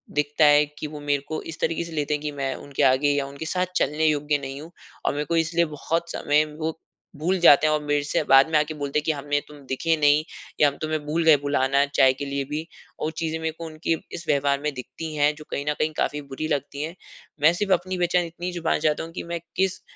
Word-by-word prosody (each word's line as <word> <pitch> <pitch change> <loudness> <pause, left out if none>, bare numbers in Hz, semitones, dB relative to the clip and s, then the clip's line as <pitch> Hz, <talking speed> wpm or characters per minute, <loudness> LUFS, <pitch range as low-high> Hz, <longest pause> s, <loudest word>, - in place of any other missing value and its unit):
दिखता 150 +1 +2
है 145 0 +6
कि 150 - -3
वो 150 0 -8
मेरे 145 -1 0
को 155 - -3
इस 160 - -10
तरीके 165 +1 0
से 170 - -9
लेते 150 -1 -1
हैं 150 - -1
कि 150 -1 -3
मैं 135 -2 -2
उनके 145 0 -3
आगे 135 +2 +4
या 145 -1 0
उनके 140 +3 -7
साथ 180 +3 0
चलने 150 +1 +1
योग्य 150 -1 +1
नहीं 135 0 -7
हूँ। 165 - -11 0.3
और - - +2
मेरे 145 +1 -2
को 170 - -1
इसलिए 170 +1 +2
बहुत 165 +2 -3
समय 150 +1 +2 0.2
वो 160 0 -1 0.5
भूल 180 +5 0
जाते 155 -3 +7
हैं 155 - +3
और 150 - 0
मेरे 145 0 +1
से 145 - 0
बाद 135 +4 +7
में 155 - +4
आके 150 +1 -1
बोलते 145 0 -1
हैं - - -7
कि 160 - +2
हमें 145 0 -1
तुम 150 -1 -13
दिखे 160 +5 0
नहीं 150 0 +4 0.4
या 150 - +7
हम 140 - -3
तुम्हें 155 0 -1
भूल 160 +3 0
गए 155 -3 +7
बुलाना 140 -1 +2
चाय 135 -2 +4
के 135 +2 -6
लिए 140 0 -2
भी। 150 +3 -4 0.3
और 155 - -2
चीज़ें 160 0 -2
मेरे 160 0 -2
को 165 - -6
उनकी 160 +1 -1 0.2
इस 170 -1 -7
व्यवहार 140 -1 +2
में 150 -1 -2
दिखती 155 +5 -7
हैं 145 0 +3
जो 155 0 -12
कहीं 140 - -3
न - - +2
कहीं 155 - +1
काफ़ी 150 - -1
बुरी 140 +2 -5
लगती 145 -1 -2
है। 165 +3 -5 0.5
मैं 155 +3 +6
सिर्फ़ 195 +2 +1
अपनी 185 +1 -1
पहचान 175 0 +2
इतनी 175 +2 -6
छुपाना 170 -2 0
चाहती 150 0 +1
हूँ 165 - -8
कि 180 - -6
मैं 170 - -2 0.2
किस 190 -1 0
150 Hz, 255 wpm, -24 LUFS, 145-160 Hz, 0.5 s, जाते